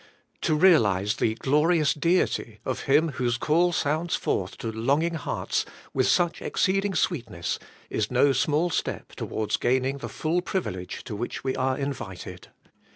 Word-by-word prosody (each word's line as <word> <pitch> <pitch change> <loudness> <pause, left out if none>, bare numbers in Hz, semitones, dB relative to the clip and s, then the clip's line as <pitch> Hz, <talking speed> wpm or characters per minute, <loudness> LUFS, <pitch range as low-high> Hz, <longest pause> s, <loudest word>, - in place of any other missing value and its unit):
'To 155 - +2
realize 110 - +4
the 110 - +1
glorious 150 +4 +3
Deity 150 - 0
of 130 - -3
Him 155 +4 +4
whose 125 -3 -1
call 170 +6 +2
sounds 160 +1 0
forth 90 -1 -2
to 115 - -4
longing 140 +10 +1
hearts 165 - -2 0.3
with 130 -1 +2
such 175 -2 +2
exceeding 195 0 0
sweetness 115 - -1 0.3
is 105 -1 0
no 135 +2 +4
small 150 +6 +1
step - - -3
towards 110 -1 -2
gaining 130 +3 +1
the - - -6
full 165 +3 -1
privilege 95 - -4
to 105 - -6
which 120 +4 -4
we 130 -1 -1
are 130 0 0
invited. 125 -10 -6
140 Hz, 150 wpm, -26 LUFS, 115-165 Hz, 0.3 s, realize